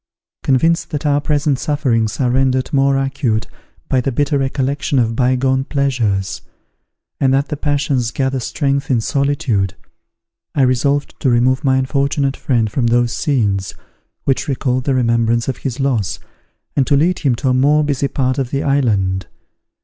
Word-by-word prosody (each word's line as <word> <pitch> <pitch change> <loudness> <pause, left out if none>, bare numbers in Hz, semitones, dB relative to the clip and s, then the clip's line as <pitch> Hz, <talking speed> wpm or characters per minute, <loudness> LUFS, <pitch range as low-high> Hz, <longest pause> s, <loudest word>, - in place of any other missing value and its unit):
Convinced 165 +6 +2
that 150 -1 -4
our 145 0 +2
present 145 -2 0
sufferings 125 -8 0
are 125 -3 +1
rendered 130 0 +1
more 135 0 +3
acute 135 -5 -1 0.4
by 130 - +1
the 135 - -1
bitter 145 +3 0
recollection 140 +1 -1
of 115 -2 +1
bygone 130 +1 +1
pleasures, 120 -10 -1 0.8
and 135 -1 +2
that 140 +2 0
the 150 - -2
passions 140 -4 0
gather 130 +2 -1
strength 140 +2 -1
in 125 -4 +2
solitude, 120 - 0 0.8
I 140 - +3
resolved 140 +3 +1
to 130 - +1
remove 125 +3 +2
my 130 -2 +3
unfortunate 140 +1 0
friend 120 -5 0
from 120 0 0
those 120 0 +2
scenes 100 -9 -1 0.5
which 135 +3 0
recalled 130 -2 -1
the 135 - +1
remembrance 115 -1 +1
of 130 - -2
his 135 -1 -5
loss, 125 -9 0 0.6
and 135 - +2
to 140 - +3
lead 175 +5 +2
him 135 -5 +1
to 130 +3 -1
a - - +3
more 145 +4 +3
busy 140 -1 0
part 130 -1 -1
of 130 -3 -2
the 140 +1 -2
island. 100 - +1
130 Hz, 160 wpm, -17 LUFS, 120-140 Hz, 0.8 s, more